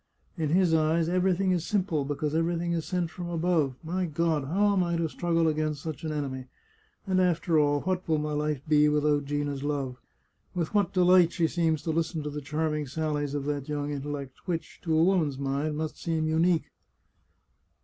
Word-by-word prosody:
" - - -41
In 155 -2 0
his 175 +1 +3
eyes 160 +1 +2
everything 185 +1 +2
is 175 -3 +1
simple, 180 -7 0
because 145 +1 -2
everything 170 +1 0
is 165 -2 -2
sent 180 -3 -1
from 175 -1 -6
above. 165 -5 +1
My 180 +3 -1
God, 160 -2 0
how 200 +7 +2
am 190 - +2
I 170 -1 -1
to 165 -1 0
struggle 165 +1 0
against 155 -1 -1
such 160 -1 -5
an 160 - -2
enemy? 135 -4 -3 0.6
And 185 -2 +2
after 170 -2 +2
all, 145 -1 +2
what 185 -1 -2
will 160 - +3
my 150 0 -2
life 150 -2 -1
be 150 0 +5
without 150 -1 +2
Gina's 145 -1 -2
love? 140 -4 -2 0.6
With 170 0 -2
what 200 -4 +2
delight 180 -2 +5
she 170 - +1
seems 160 -3 0
to 165 - -1
listen 160 -1 -1
to 150 - -4
the 150 0 -5
charming 150 +1 -2
sallies 145 0 -2
of 140 -1 -2
that 145 -1 -3
young 145 0 -2
intellect, 140 0 -6
which, 170 -2 -4
to 160 -2 +2
a 160 - +5
woman's 170 -7 +2
mind, 140 +2 -2
must 155 0 -4
seem 160 -2 -1
unique 165 +1 +2
160 Hz, 195 wpm, -28 LUFS, 145-170 Hz, 0.6 s, be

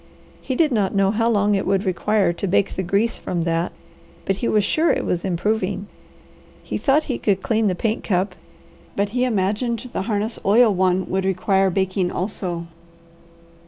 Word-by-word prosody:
He 260 - -3
did 310 +1 +3
not 205 -5 0
know 195 0 +3
how 225 +2 +1
long 205 -2 +2
it 195 - 0
would 195 +1 +1
require 190 0 +1
to 195 - -4
bake 195 +2 +1
the - - -1
grease 200 +5 0
from 175 -2 -2
that, 165 +1 -1 0.5
but 195 - 0
he 235 - -2
was 210 -1 +2
sure 315 +10 +2
it - - -1
was 175 -1 -1
improving. 195 +1 -1 0.8
He - - -4
thought 295 +2 +3
he 255 - -3
could 195 -2 0
clean 225 -1 +1
the 185 - +1
paint 220 +4 -1
cup, 185 0 0 0.6
but 200 0 0
he 250 +4 0
imagined 230 +3 -1
the - - -1
harness 215 +2 -2
oil 220 +2 +5
one 185 0 +1
would 190 0 -1
require 190 +1 +2
baking 190 0 0
also. 180 -3 -3
200 Hz, 180 wpm, -22 LUFS, 185-220 Hz, 0.8 s, oil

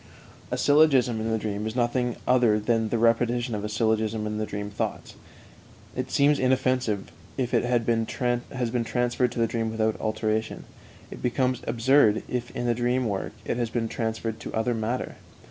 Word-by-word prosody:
A - - -2
syllogism 135 -6 +4
in 110 - -2
the 110 - +1
dream 105 0 -3
is 110 - -5
nothing 120 0 0
other 120 -4 +4
than 110 0 +1
the 120 - 0
repetition 115 +1 +2
of 105 -1 -3
a 105 - -3
syllogism 110 0 0
in 105 0 -3
the 110 - -2
dream 105 0 -5
thoughts; 105 - -4 0.8
it - - -3
seems 145 +1 +3
inoffensive 130 -5 +1 0.3
if 125 -3 -2
it - - +3
has 120 -1 +2
been 115 -1 +1
transferred 120 -1 -1
to - - -8
the 115 - +3
dream 115 -1 -2
without 110 0 -1
alteration; 110 0 -1 0.5
it - - -9
becomes 125 0 0
absurd 115 -2 +4
if 120 -1 -3
in 120 - -2
the 120 - +2
dream 125 +2 0
work 100 -2 -3
it - - -1
has 120 -2 -1
been 115 -1 -1
transferred 115 -1 -3
to - - -7
other 110 +2 +1
matter. 115 +3 -3
115 Hz, 180 wpm, -26 LUFS, 110-125 Hz, 0.8 s, syllogism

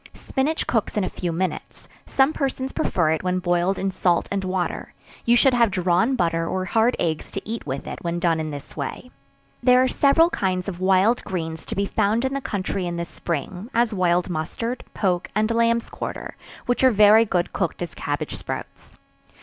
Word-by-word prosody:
Spinach 295 +4 -1
cooks 225 -2 -1
in 205 - +2
a 185 - -1
few 175 -2 -3
minutes; 180 +3 -4 0.2
some 270 +3 +3
persons 270 -2 -2
prefer 165 -4 +1
it 160 - 0
when 185 0 0
boiled 180 +1 +1
in 195 0 -1
salt 175 -2 +1
and 200 -1 -1
water; 185 -1 -3 0.3
you 235 - +5
should 260 +2 +5
have 235 -2 +4
drawn 185 +6 +2
butter 165 -5 0
or 185 +1 -2
hard 225 +6 +2
eggs 160 -2 -2
to 195 - -6
eat 225 -6 -5
with 135 0 -4
it - - -6
when 170 0 -2
done 170 -2 +1
in 155 -1 -3
this 145 -2 -8
way. 150 - -5 0.5
There 250 0 +5
are - - +3
several 310 +6 +4
kinds 185 -2 -1
of 180 -3 -5
wild 190 +5 +3
greens 160 -4 -5
to - - -4
be 200 - +1
found 215 +5 +1
in 265 - -1
the 275 - -2
country 195 -4 -2
in 170 0 -3
the 170 - -2
spring, 175 - -5
as 235 -1 +2
wild 180 -2 +2
mustard, 190 +9 -3
poke 180 -3 0
and 215 +1 +2
lambs 230 0 +2
quarter, - - -6 0.3
which 245 0 0
are 260 - +8
very 215 0 +6
good 180 -5 -1
cooked 175 -2 -2
as 175 - -6
cabbage 145 -7 -3
sprouts. 90 -2 -7
190 Hz, 200 wpm, -23 LUFS, 175-230 Hz, 0.5 s, are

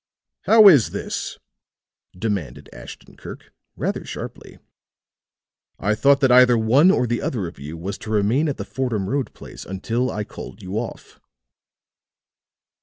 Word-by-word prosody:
"How 220 -2 +7
is 145 - +6
this?" - - -5 0.8
demanded 100 -6 -4
Ashton - - -12
Kirk, - - -11 0.2
rather - - -3
sharply. - - -9 1.2
"I 100 +2 0
thought 140 +6 +3
that 135 -2 +4
either 125 -1 +6
one 125 +10 +4
or 155 -10 +2
the 120 0 -2
other 110 -8 -2
of 85 -4 -9
you 75 +4 -8
was 95 +5 -6
to 110 - -9
remain 110 +9 +1
at 140 - -4
the - - -5
Fordham 115 -7 -3
Road 135 +3 -2
place - - -11
until 115 +7 -2
I 105 - -3
called 105 0 -11
you 95 +1 -7
off." 120 - -8
115 Hz, 145 wpm, -22 LUFS, 100-130 Hz, 1.2 s, How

